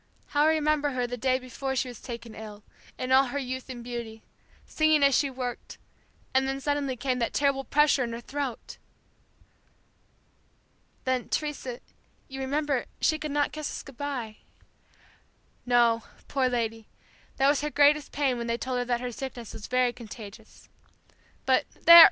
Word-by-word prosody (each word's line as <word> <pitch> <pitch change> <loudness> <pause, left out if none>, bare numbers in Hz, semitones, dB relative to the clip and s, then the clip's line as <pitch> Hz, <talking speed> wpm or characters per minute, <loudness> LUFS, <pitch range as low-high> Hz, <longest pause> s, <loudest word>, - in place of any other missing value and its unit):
How 295 +1 +3
I 315 0 +4
remember 300 -2 +1
her 250 -1 0
the 245 +1 -4
day 255 +2 +2
before 265 +1 -4
she 255 - 0
was 245 -3 -9
taken 235 -2 -7
ill, 210 -1 -9 0.3
in 255 - -3
all 265 +1 +6
her 270 +2 -4
youth 260 -1 -4
and 245 -2 -7
beauty 235 -2 -6 0.4
singing 310 -2 +3
as 275 -2 +5
she 280 - +2
worked, 250 -2 -5 0.6
and 265 0 +3
then 270 0 -2
suddenly 285 -2 -1
came 255 0 -1
that 230 - -1
terrible 275 -1 +2
pressure 290 0 +3
in 235 - -3
her 230 - -4
throat." 265 -1 -5 2.2
"Then, 260 -1 -1
Teresa, 280 -5 -3 0.5
you 270 0 -7
remember, 280 0 0
she 310 0 +2
could 305 - -4
not 290 0 +1
kiss 305 -1 -4
us - - -6
goodbye." 265 -5 -5 1.3
"No, 235 -2 +4 0.3
poor 265 -2 +1
lady, 225 -2 -2 0.5
that 270 - +4
was 285 0 +3
her 300 - -1
greatest 295 0 +4
pain 270 -4 0
when 235 - -3
they 235 0 0
told 250 +1 -2
her 245 - -1
that 240 -1 0
her 250 0 -3
sickness 240 -2 -7
was 210 - -8
very 250 -1 +2
contagious. 220 -2 -11 0.8
But - - +3 0.2
there! 340 0 +12
260 Hz, 165 wpm, -28 LUFS, 240-285 Hz, 2.2 s, there